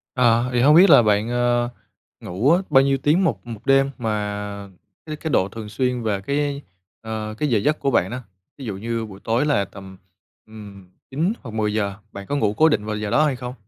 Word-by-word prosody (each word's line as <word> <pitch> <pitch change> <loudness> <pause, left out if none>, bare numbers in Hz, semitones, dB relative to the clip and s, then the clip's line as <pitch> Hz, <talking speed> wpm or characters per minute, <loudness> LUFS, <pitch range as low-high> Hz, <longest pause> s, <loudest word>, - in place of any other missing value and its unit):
À, 120 -1 +3
thì 120 - +1
hông 145 +4 +6
biết 185 +4 +7
là - - +8
bạn, 105 +1 +1
ờ, 120 0 +1 0.5
ngủ 110 - 0
á, 175 - +4
bao 135 0 +5
nhiêu 135 0 +1
tiếng 150 +8 +2
một 165 - -2
một 115 -2 -9
đêm? 135 0 +4
Mà 105 -3 -4 0.4
cái 155 - -5
cái 160 - -5
độ 95 -7 +2
thường 110 +1 -8
xuyên 125 +1 -1
về 100 -3 -1
cái, 140 +4 -2 0.4
ờ, 110 -1 -5
cái 150 - -1
giờ 115 -4 +2
giấc 150 +9 0
của 140 - 0
bạn 95 -6 +2
đó. 125 - -4 0.4
Ví 135 - -8
dụ 100 -4 -4
như 115 +2 -3
buổi 100 -2 -12
tối 115 +5 +1
là 125 -10 +1
tầm, 95 -1 -12 0.5
ừm, 100 -4 -13 0.2
9 165 +10 0
hoặc 115 - -9
10:00, 105 -2 -1 0.2
bạn 100 0 -9
có 145 - -2
ngủ 110 -7 +1
cố 160 +1 +5
định 105 -8 0
vào 110 0 -3
giờ 105 0 -4
đó 155 +8 +3
hay 140 - 0
không? 125 0 -7
115 Hz, 225 wpm, -22 LUFS, 105-135 Hz, 0.5 s, là